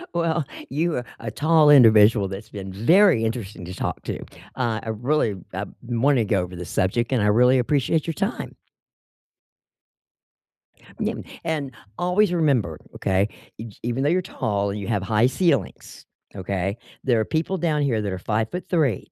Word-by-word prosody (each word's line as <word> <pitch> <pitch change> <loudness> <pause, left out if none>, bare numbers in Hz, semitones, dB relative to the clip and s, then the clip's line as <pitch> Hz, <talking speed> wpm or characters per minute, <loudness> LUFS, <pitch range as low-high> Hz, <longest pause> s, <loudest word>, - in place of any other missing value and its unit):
Well, 165 -3 0 0.2
you 160 +5 0
are 120 - -3
a 115 - -5
tall 155 +5 +3
individual 110 -6 +6
that's 100 +2 -7
been 95 -2 -7
very 160 - +4
interesting 105 -5 -5
to 90 - -7
talk - - -4
to. - - -4 0.4
Uh, 115 -4 -1
I - - -11
really, 115 -1 0 0.2
uh, 95 +2 -3 0.2
wanna 120 +1 +2
go 100 -1 +1
over 90 0 -6
this 90 -2 -7
subject, 115 +7 0
and 125 -5 +2
I - - +2
really 125 +5 +4
appreciate 145 +5 0
your 165 - -1
time. - - -3 2.4
Yeah, - - -1 0.3
and 150 -5 -2 0.3
always 180 +2 +2
remember, 130 - +1 0.2
okay, 95 +1 +1 0.3
e 115 +1 -7
even 120 +3 -1
though 145 - +2
you're 185 +2 +2
tall 100 - -2
and 105 - -4
you 100 - -6
have 105 -4 -1
high 110 +4 +3
ceilings, 160 +1 -1 0.3
okay, 95 +1 -3 0.3
there 120 -4 +2
are 110 - 0
people 165 +4 -1
down 155 -4 0
here 120 -6 +1
that 100 -2 -3
are 95 - -3
5'3", 120 - -1
120 Hz, 165 wpm, -23 LUFS, 105-150 Hz, 2.4 s, individual